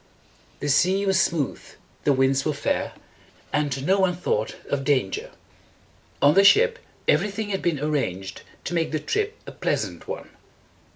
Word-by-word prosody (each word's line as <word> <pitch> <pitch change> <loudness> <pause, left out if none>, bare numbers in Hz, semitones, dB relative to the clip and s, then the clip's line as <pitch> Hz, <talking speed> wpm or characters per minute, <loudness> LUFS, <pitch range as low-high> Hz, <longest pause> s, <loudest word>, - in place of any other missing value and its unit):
The 145 - -2
sea 185 +7 +3
was 190 -2 +3
smooth, 155 -6 -1 0.4
the 145 - +5
winds 135 0 +2
were 155 - 0
fair, 145 - -1 0.6
and 145 -2 0
no 195 +3 +3
one 185 -2 +2
thought 110 -11 -1
of 140 -1 -1
danger. 130 -9 0 0.9
On 145 - +7
the 195 - +6
ship, 485 - +5 0.3
every 210 - +3
thing 205 +1 -4
had 195 -1 -2
been 170 -5 0
ar 150 - -1
ranged 95 -10 -2 0.2
to - - -4
make 165 -1 0
the 155 - 0
trip 425 - -2
a - - -8
pleasant - - -2
one. - - -6
155 Hz, 165 wpm, -24 LUFS, 140-195 Hz, 0.9 s, On